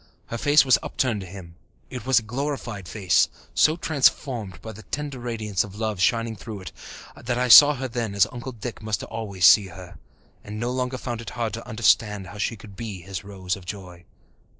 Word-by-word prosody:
Her 115 - -3
face 145 +2 +5
was 130 - +5
upturned 120 -6 -1
to 95 - -8
him; 90 -2 -10 0.4
it 125 -1 -7
was 130 -3 +4
a 115 - +3
glorified 120 -5 -4
face, 95 -6 +2 0.2
so 155 - +4
transformed 130 - 0
by 110 - -8
the 110 0 -11
tender 140 +5 -5
radiance 110 -5 -2
of 100 -1 -11
love 110 -3 -3
shining 115 +2 +1
through 105 0 -8
it 95 - -8 0.4
that 120 0 -3
I 125 0 0
saw 145 +5 +10
her 130 0 -4
then 115 -4 -4
as 100 - +5
Uncle 125 +1 -7
Dick 115 +1 -7
must 110 -1 -2
always 100 -6 -2
see 100 +2 +7
her, 95 -2 -12 0.4
and 105 +1 -7
no 120 +2 -2
longer 125 0 -2
found 120 -2 -5
it 115 - -7
hard 115 -3 -2
to 115 +2 -7
understand 105 -3 +2
how 100 +3 -10
she 115 - -1
could 100 -2 -13
be 105 -4 -6
his 95 0 -6
Rose 95 -2 -4
of 95 - -12
joy. 90 -3 -8
110 Hz, 205 wpm, -24 LUFS, 100-125 Hz, 0.4 s, saw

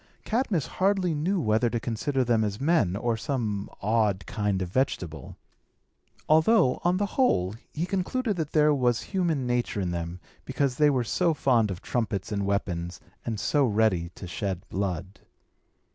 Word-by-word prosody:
Cadmus 220 - 0
hardly 190 -2 +1
knew 175 +6 0
whether 115 -2 +2
to 120 - -1
consider 130 +4 -1
them 115 -2 +2
as 105 -1 -2
men, 135 - +2
or 115 +2 0
some 110 -5 -2
odd 105 -2 +1
kind 105 -3 -1
of 90 - -5
vegetable; 90 - -2 0.9
although, 160 - +4
on 175 +1 +2
the 205 - +1
whole, 150 - +1 0.2
he 160 +3 -2
concluded 200 +5 -1
that 155 -3 -2
there 150 -1 +5
was 125 -4 +1
human 170 -9 -1
nature 120 -3 -1
in 90 -3 -1
them, 85 +1 -4 0.2
because 140 -3 -1
they 150 -1 +5
were 130 -4 +1
so 165 +7 +1
fond 120 -7 +2
of 90 -2 -6
trumpets 105 -5 -2
and 100 -1 -1
weapons, 90 -4 -2 0.3
and 110 -3 -2
so 145 +5 +2
ready 105 -7 +2
to - - -8
shed 90 0 -4
blood. 95 -1 -3
120 Hz, 160 wpm, -27 LUFS, 100-155 Hz, 0.9 s, there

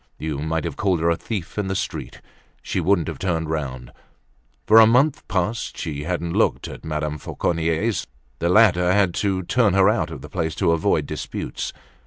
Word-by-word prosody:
You 75 -3 -4
might 80 +2 -1
have 80 -5 -5
called 95 -4 +1
her 85 +1 +2
a - - +2
thief 100 +1 -5
in 100 - -1
the 95 - -2
street, 95 - -5 0.4
she - - -2
wouldn't 90 -2 +2
have - - -5
turned 80 -4 -1
round. 65 -5 -4 0.7
For 110 +1 +7
a 110 - +8
month 130 +6 +2
past 100 +5 -2
she 75 -3 -4
hadn't 85 -1 -2
looked - - +1
at - - -9
Madame 75 -1 -3
Fauconnier's; 85 +9 -1 0.3
the 85 - 0
latter 90 -3 +5
had - - +3
had 95 -4 +3
to 95 -1 -1
turn 110 -1 +2
her 95 +1 +5
out 85 -5 -1
of 80 -5 -8
the - - -7
place 80 -1 -2
to 85 - +2
avoid 85 -1 +1
disputes. - - -5
85 Hz, 195 wpm, -22 LUFS, 80-100 Hz, 0.7 s, a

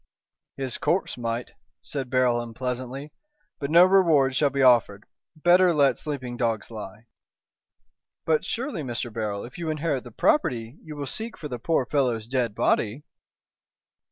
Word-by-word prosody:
"His 135 -2 -4
corpse 185 +3 0
might," 120 0 -3 0.3
said 135 -3 -5
Beryl, 125 -2 +2
unpleasantly, 125 +4 -5 0.5
"but 140 - -3
no 170 +3 +8
reward 165 -9 +4
shall 145 +1 +3
be 140 0 0
offered. 115 -5 +4 0.3
Better 175 +2 +4
let 140 -2 +3
sleeping 130 -5 -5
dogs 115 -2 -1
lie." 105 0 -9 1.2
"But 160 -1 +2
surely, 255 - -3
Mr. 120 -3 -4
Beryl, 105 -3 -3
if 120 +7 -11
you 165 -2 -3
inherit 155 -4 -1
the 120 - -10
property, 120 - 0
you 155 -1 -9
will 145 -1 -4
seek 220 - -5
for 150 - -7
the 125 -2 -5
poor 145 +1 +1
fellow's 125 -5 0
dead 120 -3 -1
body?" 115 +6 +1
130 Hz, 150 wpm, -25 LUFS, 120-150 Hz, 1.2 s, no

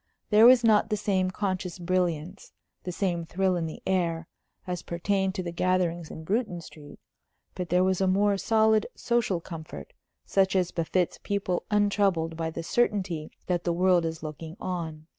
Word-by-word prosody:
There 215 +2 +8
was 250 -1 +7
not 220 -1 +4
the 210 - 0
same 195 -3 0
conscious 185 -2 -3
brilliance, 180 0 -2 0.3
the 180 - -2
same 175 -2 -1
thrill 185 +3 0
in 165 -2 -1
the 155 - -9
air, 170 -3 0 0.4
as 180 -1 -3
pertained 190 +2 -1
to 185 - -2
the 170 - -4
gatherings 175 -2 0
in 160 - -8
Bruton 200 0 -1
Street. 150 -3 -13 0.5
But 180 -2 -5
there 180 +1 +3
was 190 0 +1
a 190 - +3
more 200 +2 +3
solid 220 0 +3
social 235 -7 0
comfort, 160 - -9 0.3
such 195 -1 +2
as 185 -2 +1
befits 175 +1 -1
people 200 -3 -2
untroubled 200 -6 +1
by 165 0 -2
the 165 +1 -6
certainty 185 -6 0 0.2
that 175 -1 -1
the 170 - 0
world 180 0 +3
is 160 -1 -4
looking 160 +3 -7
on. 160 -4 -4
185 Hz, 170 wpm, -27 LUFS, 165-195 Hz, 0.5 s, There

